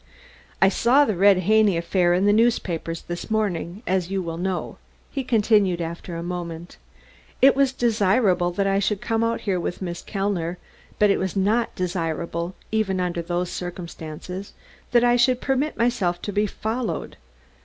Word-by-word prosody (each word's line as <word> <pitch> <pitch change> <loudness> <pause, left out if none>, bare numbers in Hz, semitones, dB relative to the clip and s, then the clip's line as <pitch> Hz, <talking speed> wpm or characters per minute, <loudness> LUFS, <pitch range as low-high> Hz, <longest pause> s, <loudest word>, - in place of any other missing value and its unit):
"I - - +7
saw 245 +8 +4
the 215 - -1
Red 195 +1 +5
Haney 210 -1 +3
affair 175 +1 +2
in 185 +2 +2
the 205 - +5
newspapers 180 -7 0
this 175 +5 -6
morning, 205 -2 -2
as 185 -1 0
you 195 -1 -1
will 165 -1 -5
know," 185 0 -3 0.3
he 275 - -3
continued 210 -6 +2
after 170 +1 -5
a 165 - -4
moment. 175 -1 -6 0.6
"It 270 0 +6
was 275 -1 +3
desirable 205 -6 +2
that 195 +3 -1
I 195 0 +2
should 200 0 0
come 225 +1 -1 0.2
here 190 -3 -1
with 175 - -4
Miss 175 -2 -5
Kellner, 195 -4 -2 0.4
but 210 -1 +4
it - - +1
was 190 +1 -2
not 210 +5 +1
desirable, 170 -1 -3 0.2
even 210 -4 0
under 175 -1 -1
those 175 +1 -2
circumstances, 175 +1 -7 0.4
that 240 -1 +4
I 240 0 +4
should 250 +1 +3
permit 270 +4 -1
myself 230 -8 +1
to 205 - -4
be 210 +1 +1
followed. 225 +4 -3
190 Hz, 165 wpm, -23 LUFS, 175-220 Hz, 0.6 s, I